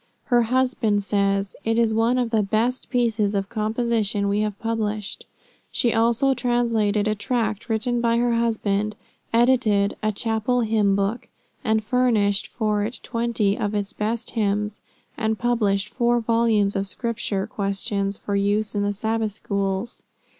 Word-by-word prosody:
Her 240 Hz, -, +6 dB
husband 235 Hz, -4 st, +1 dB
says, 200 Hz, -1 st, 0 dB
"It 225 Hz, 0 st, 0 dB
is 230 Hz, -2 st, +3 dB
one 230 Hz, +3 st, +2 dB
of 245 Hz, -2 st, 0 dB
the 220 Hz, -2 st, +3 dB
best 225 Hz, +5 st, -1 dB
pieces 225 Hz, -5 st, +1 dB
of 195 Hz, -1 st, -1 dB
composition 220 Hz, -2 st, 0 dB
we 200 Hz, +1 st, +1 dB
have 210 Hz, -1 st, -1 dB
published." 215 Hz, -2 st, -3 dB, 0.4 s
She 235 Hz, -, +1 dB
also 235 Hz, +4 st, +3 dB
translated 230 Hz, -4 st, +1 dB
a 215 Hz, -, +2 dB
tract 220 Hz, 0 st, -2 dB
written 235 Hz, +2 st, 0 dB
by 230 Hz, 0 st, +2 dB
her 240 Hz, 0 st, +2 dB
husband; 215 Hz, -3 st, 0 dB, 0.4 s
edited 230 Hz, -4 st, +3 dB
a 215 Hz, -, +1 dB
"Chapel 225 Hz, +3 st, 0 dB
hymn 215 Hz, -3 st, +2 dB
book," 200 Hz, +4 st, -1 dB, 0.4 s
and 220 Hz, -2 st, +1 dB
furnished 215 Hz, -4 st, +2 dB
for 210 Hz, -3 st, -1 dB
it 230 Hz, +4 st, -3 dB
twenty 230 Hz, -4 st, 0 dB
of 210 Hz, 0 st, -2 dB
its 205 Hz, -1 st, -2 dB
best 220 Hz, +2 st, -2 dB
hymns; 210 Hz, -1 st, -1 dB, 0.4 s
and 220 Hz, -1 st, 0 dB
published 210 Hz, -4 st, +1 dB
four 240 Hz, -1 st, +1 dB
volumes 225 Hz, -3 st, +2 dB
of 195 Hz, 0 st, 0 dB
Scripture 215 Hz, -2 st, -2 dB
Questions 200 Hz, -1 st, -2 dB
for 200 Hz, -, -3 dB
use 205 Hz, +2 st, +1 dB
in 205 Hz, -, 0 dB
the 205 Hz, 0 st, 0 dB
Sabbath 220 Hz, +1 st, -1 dB
Schools. 200 Hz, +1 st, -3 dB
220 Hz, 150 wpm, -23 LUFS, 205-235 Hz, 0.4 s, Her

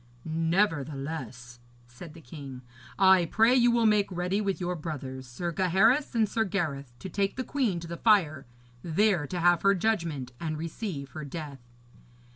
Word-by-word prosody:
'Nevertheless,' 155 Hz, -, -2 dB, 0.3 s
said 150 Hz, +7 st, -12 dB
the 165 Hz, -, -12 dB
king, 135 Hz, -3 st, -10 dB, 0.3 s
'I 190 Hz, -2 st, +6 dB
pray 225 Hz, +7 st, +4 dB
you 245 Hz, -2 st, +5 dB
will 235 Hz, -1 st, +2 dB
make 210 Hz, -2 st, +3 dB
ready 180 Hz, +3 st, -1 dB
with 195 Hz, -2 st, -2 dB
your 180 Hz, 0 st, -2 dB
brothers, 135 Hz, -5 st, -6 dB
Sir 170 Hz, +8 st, -4 dB
Gaheris 195 Hz, -, +2 dB
and 220 Hz, -2 st, +3 dB
Sir 225 Hz, +2 st, 0 dB
Gareth, 155 Hz, -, -3 dB
to 190 Hz, -, -8 dB
take 195 Hz, +2 st, -1 dB
the 255 Hz, -, -3 dB
queen 245 Hz, -11 st, -1 dB
to 170 Hz, -, -8 dB
the 170 Hz, 0 st, -6 dB
fire, 160 Hz, -, +2 dB, 0.3 s
there 175 Hz, -1 st, +1 dB
to 180 Hz, -, -4 dB
have 175 Hz, 0 st, +4 dB
her 200 Hz, 0 st, +4 dB
judgment 170 Hz, -, -1 dB
and 155 Hz, -2 st, -3 dB
receive 160 Hz, -, -5 dB
her 155 Hz, -, -7 dB
death.' 145 Hz, -2 st, -7 dB
170 Hz, 165 wpm, -28 LUFS, 145-200 Hz, 0.3 s, I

